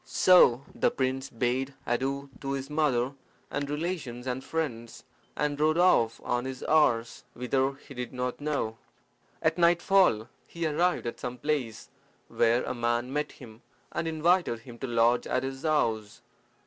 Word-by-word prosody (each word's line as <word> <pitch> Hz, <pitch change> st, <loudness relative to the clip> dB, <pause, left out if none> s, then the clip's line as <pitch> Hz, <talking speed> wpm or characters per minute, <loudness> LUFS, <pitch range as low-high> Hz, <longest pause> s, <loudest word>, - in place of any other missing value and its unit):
So 140 Hz, -9 st, +5 dB
the -, -, +2 dB
prince 130 Hz, 0 st, -2 dB
bade 125 Hz, +3 st, -1 dB
adieu 135 Hz, +3 st, -2 dB
to 135 Hz, 0 st, -3 dB
his 135 Hz, +1 st, -5 dB
mother 140 Hz, -4 st, +1 dB, 0.4 s
and 145 Hz, -1 st, -2 dB
relations 150 Hz, -6 st, -4 dB
and 130 Hz, 0 st, -3 dB
friends, 120 Hz, -8 st, -4 dB, 0.3 s
and 145 Hz, 0 st, -1 dB
rode 155 Hz, +1 st, +3 dB
off 120 Hz, -11 st, +4 dB
on 120 Hz, +1 st, -1 dB
his 130 Hz, -1 st, -6 dB
horse, 120 Hz, -7 st, +2 dB
whither 130 Hz, +2 st, 0 dB
he 140 Hz, +1 st, -14 dB
did 125 Hz, -1 st, -5 dB
not 125 Hz, +1 st, -3 dB
know. 140 Hz, -7 st, -2 dB, 0.6 s
At 170 Hz, -, +1 dB
nightfall 175 Hz, -, +4 dB, 0.2 s
he 170 Hz, -1 st, -4 dB
arrived 170 Hz, +2 st, +1 dB
at 120 Hz, -, -4 dB
some 125 Hz, 0 st, -5 dB
place, 135 Hz, -6 st, -2 dB, 0.4 s
where 120 Hz, +2 st, +2 dB
a -, -, -3 dB
man 120 Hz, +1 st, -1 dB
met 150 Hz, +1 st, -2 dB
him, 115 Hz, -4 st, -13 dB, 0.3 s
and 165 Hz, -, -2 dB
invited 160 Hz, -6 st, +1 dB
him 120 Hz, -1 st, -12 dB
to 135 Hz, -, -4 dB
lodge 120 Hz, 0 st, +2 dB
at -, -, 0 dB
his 135 Hz, 0 st, -5 dB
house. 115 Hz, -10 st, 0 dB
135 Hz, 155 wpm, -28 LUFS, 120-150 Hz, 0.6 s, So